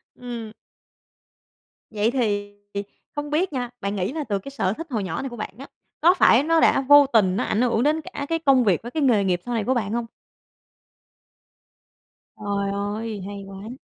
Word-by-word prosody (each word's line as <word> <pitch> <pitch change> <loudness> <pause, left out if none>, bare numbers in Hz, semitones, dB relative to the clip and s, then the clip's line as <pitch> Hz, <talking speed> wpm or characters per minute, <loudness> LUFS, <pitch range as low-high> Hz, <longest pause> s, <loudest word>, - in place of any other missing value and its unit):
Ừm. 235 -3 -7 1.4
Vậy 215 +1 +1
thì, 205 -5 -1 0.2
ì, 200 0 -2 0.3
không 290 0 -4
biết 310 +3 0
nha, 250 -2 -2
bạn 200 +1 -2
nghĩ 190 +2 -1
là 310 -1 -3
từ 205 -6 -2
cái 275 - -9
sở 195 -8 0
thích 330 +9 -7
hồi 220 -6 -2
nhỏ 180 -4 -3
này 270 - -4
của 240 - -8
bạn 215 - -5
á, 275 +3 -9 0.3
có 340 +3 +6
phải 270 -8 +5
nó 330 +2 +3
đã 275 - +4
vô 290 +1 +7
tình 190 -5 +4
nó - - 0
ảnh 215 - 0
hưởng 240 -2 +2
đến 305 +3 +2
cả 285 -2 -6
cái 330 0 0
công 275 -5 +4
việc 195 -7 +2
với 240 - -8
cái 310 +1 -1
nghề 230 -7 +4
nghiệp 180 -2 +1
sau 245 - -3
này 225 -2 0
của 255 - +1
bạn 220 -4 -2
hông? 235 0 -1 2.3
Trời 200 -1 -2
ơi, 205 +1 -3
hay 200 -1 -7
quá! 195 +2 -9
230 Hz, 205 wpm, -23 LUFS, 205-275 Hz, 2.3 s, vô